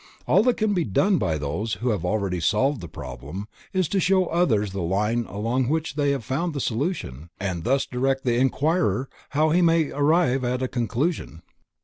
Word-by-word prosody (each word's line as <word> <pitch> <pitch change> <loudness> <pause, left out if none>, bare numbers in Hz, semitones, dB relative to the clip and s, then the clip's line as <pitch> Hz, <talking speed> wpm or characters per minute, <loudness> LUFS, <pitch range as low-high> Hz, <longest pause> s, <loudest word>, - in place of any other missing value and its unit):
All - - +5
that 250 - +3
can 215 -2 +1
be 180 -3 +1
done 185 - +2
by 80 -2 0
those 80 +10 -3
who 125 +3 -2
have 100 -6 -2
really 95 -1 -1
solved 110 - +1
the 85 - -7
problem, 75 +7 -7 0.2
is 185 -3 +1
to 195 - +1
show 190 +1 +3
to - - -6
others 115 - +2
the 95 0 -4
line 105 +7 0
along 115 +5 -1
which 160 -1 -1
they 145 -1 +1
have 135 -5 -1
found 150 +6 -2
the - - -1
solution, 110 - -3
and 95 -4 -3
thus 135 +5 +1
direct 135 +1 -1
the 120 - +1
inquirer 135 +2 +1 0.3
how 155 +1 +4
he 175 - +4
also 175 - +4
may 165 -2 +3
arrive 145 -3 +2
at 125 +1 -1
a - - +1
conclusion. 120 - -2
125 Hz, 205 wpm, -24 LUFS, 100-155 Hz, 0.3 s, All